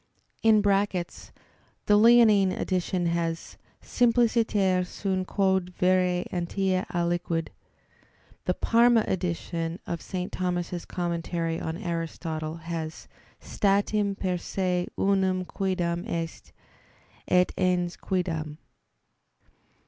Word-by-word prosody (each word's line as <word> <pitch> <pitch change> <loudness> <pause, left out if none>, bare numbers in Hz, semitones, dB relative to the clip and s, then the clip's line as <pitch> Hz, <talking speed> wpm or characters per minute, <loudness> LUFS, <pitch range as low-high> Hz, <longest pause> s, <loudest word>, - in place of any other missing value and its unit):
[*The 205 -4 +1 0.6
Leonine 215 -3 +6
edition 185 -1 -1
has, 170 -1 -2 0.3
"simpliciter 225 -6 +2
sunt 185 0 -3
quod 190 -2 0
vere 180 -1 +2
entia 185 +1 -1
aliquid." 170 -1 -1 1.0
The - - +1
Parma 235 -1 +4
edition 170 -2 -2
of 170 -1 -4
St. 185 -1 -4
Thomas's 175 -1 -2
Commentary 170 -1 -2
on 160 +1 -4
Aristotle 165 -3 -4
has, 160 -2 -5 0.3
"statim 200 0 +1
per 185 -2 -1
se 180 0 -1
unum 190 -2 +1
quiddam 175 -3 -2
est... 165 -1 -5 0.8
et 180 0 +3
ens 180 -1 0
quiddam." 160 -5 -3
180 Hz, 90 wpm, -27 LUFS, 170-195 Hz, 1.0 s, Leonine